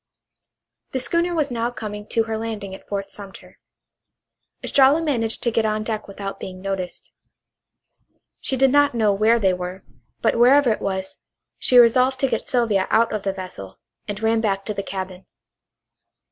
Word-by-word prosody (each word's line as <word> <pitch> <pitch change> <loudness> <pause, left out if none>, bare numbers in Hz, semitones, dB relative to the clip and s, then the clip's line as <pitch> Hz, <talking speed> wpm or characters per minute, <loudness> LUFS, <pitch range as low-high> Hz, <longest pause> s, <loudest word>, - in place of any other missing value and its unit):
The 260 - 0
schooner 340 +6 0
was 295 -4 0
now 235 0 -1
coming 210 -3 -7
to 225 - +1
her 220 0 -3
landing 220 -3 -5
at 190 - -12
Fort 200 -1 -4
Sumter. 200 -1 -10 1.0
Estralla 275 +3 +4
managed 240 -9 -1
to 235 - +2
get 225 0 +1
on 215 0 0
deck 215 -1 -4
without 200 0 -6
being 185 -1 -7
noticed. 190 -2 -5 1.3
She 265 - -3
did 265 0 +4
not 285 -2 +4
know 215 -3 +3
where 215 +4 +3
they 195 -5 +2
were, 180 +1 -6 0.4
but - - +1
wherever 255 +1 +6
it 215 - -2
was 190 -1 -4 0.4
she 250 - +3
resolved 255 +2 +5
to 270 - +3
get 230 -3 -2
Sylvia 225 -6 +1
out 230 0 +3
of 215 - -2
the 195 - -1
vessel, 180 - -9 0.3
and 205 -1 -4
ran 225 0 +2
back 195 -3 -1
to 210 - -3
the 200 - -3
cabin. 190 -1 -6
220 Hz, 170 wpm, -22 LUFS, 195-245 Hz, 1.3 s, wherever